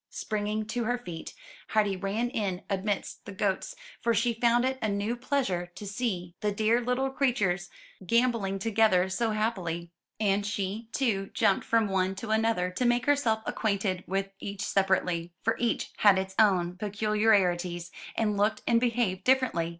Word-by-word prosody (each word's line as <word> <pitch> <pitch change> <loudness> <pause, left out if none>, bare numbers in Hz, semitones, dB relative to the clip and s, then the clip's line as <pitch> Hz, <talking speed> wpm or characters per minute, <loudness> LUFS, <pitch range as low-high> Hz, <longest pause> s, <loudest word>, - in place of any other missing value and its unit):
Springing 215 0 -2
to 235 +2 -2
her 245 +2 +1
feet, 175 -9 -8 0.3
Heidi 210 -3 +2
ran 205 +6 -2
in 200 -7 -2
amidst 195 0 -2
the - - -7
goats, 200 - -1 0.3
for 235 -1 +2
she 235 +2 +2
found 235 +2 +3
it 260 0 -1
a 220 - 0
new 205 +3 -1
pleasure 240 -9 -1
to 210 - -8
see 195 -5 -3
the 210 - +1
dear 220 +3 +2
little 250 +2 0
283 270 +1 +1
MY - - +5 0.2
BOOK 175 - -2
HOUSE 175 - -10
creatures - - -25 0.4
gamboling 230 -3 +2
together 200 -3 +3
so 230 +4 0
happily; 185 -6 -2 0.3
and 205 -1 +2
she, 210 +2 -3
too, 215 -8 0
jumped 205 -3 +3
from 225 -2 +3
one 190 -1 0
to 215 +3 -5
another 220 -5 +1
to 185 - -2
make 240 -1 +2
herself 240 -7 +2
acquainted 200 -4 -1
with 195 +1 -2
each 200 0 -5
separately, 180 -3 0
for 225 - +2
each 235 -1 -1
had 205 -3 +6
its 190 0 -2
own 180 -4 +3
peculiarities, 195 -4 +1 0.2
and 210 -2 0
looked 210 +2 +1
and 230 -1 +3
behaved 230 -6 0
differently. 255 -11 +2
210 Hz, 175 wpm, -28 LUFS, 190-230 Hz, 0.4 s, had